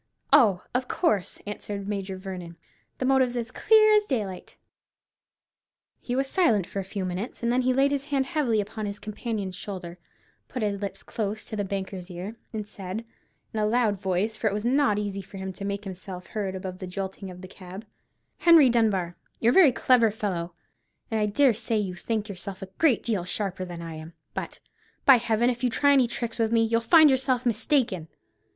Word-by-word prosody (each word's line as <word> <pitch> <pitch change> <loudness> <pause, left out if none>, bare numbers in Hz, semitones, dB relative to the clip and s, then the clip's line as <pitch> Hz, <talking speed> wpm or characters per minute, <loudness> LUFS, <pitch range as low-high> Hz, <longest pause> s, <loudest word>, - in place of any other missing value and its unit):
"Oh, 210 -10 +6
of 250 +1 0
course," 255 - 0
answered 205 -1 -5
Major 195 -2 -3
Vernon; 180 -3 -7 0.4
"the 260 - -2
motive's 260 -2 +3
as 230 -1 -3
clear 430 -1 +5
as 420 -1 +4
daylight." 205 -8 -3 1.4
He 245 - -3
was 270 +1 +1
silent 255 - +2
for 200 - -5
a - - -2
few 190 0 -4
minutes, 185 +6 -4
then 240 +2 +2
he 255 0 +2
laid 270 +2 +3
his 280 -1 -1
hand 280 -2 0
heavily 275 -8 +1
upon 215 +1 -5
his 200 0 -5
companion's 210 -3 -4
shoulder, 180 -3 -7 0.5
put 250 -4 -4
his 200 -1 -1
lips 200 -1 -5
close 215 -1 -3
to - - -5
the 205 - -1
banker's 190 -1 -5
ear, 185 +5 -6 0.2
and 215 -2 -5
said, 195 +2 -6 0.5
in 220 - -2
a 210 - +2
loud 215 -4 +1
voice, 190 +3 0
for 220 +1 -1
it 200 - +1
was 210 +2 -3
not 260 -4 +3
easy 200 -1 -3
for 195 +1 -12
him 190 0 -5
to 195 - -9
make 200 0 -3
himself 185 -1 -8
heard 195 -3 -3
above 185 -1 -6
the 185 - -6
jolting 190 +1 -5
of 180 0 -10
the 185 - -8
cab,— 190 +3 -10 0.5
"Henry 325 -7 +7
Dunbar, 195 -7 +1 0.2
you're 235 - +4
a - - +1
very 345 -8 +7
clever 240 -2 +4
fellow, 180 -5 -3 0.6
and 220 - +1
I 210 - +2
dare 260 +4 +4
say 220 +1 -1
you 195 -3 -1
think 215 +3 -3
yourself 195 -1 -7
a 190 0 -11
great 300 -8 +3
deal 210 -6 -1
sharper 185 0 -3
than 175 -1 -7
I 165 -1 -7
am; 155 +2 -10 0.2
but, - - -5 0.5
by 270 -2 +9
Heaven, 235 +1 +2
if 245 +1 -7
you 250 - +3
try 285 +4 +3
any 260 -3 +4
tricks 235 -1 -4
with 225 -1 +2
me, 230 -1 +4
you'll 230 +1 +1
find 315 +3 +7
yourself 260 -1 +1
mistaken! 225 - +1
210 Hz, 200 wpm, -26 LUFS, 190-245 Hz, 1.4 s, by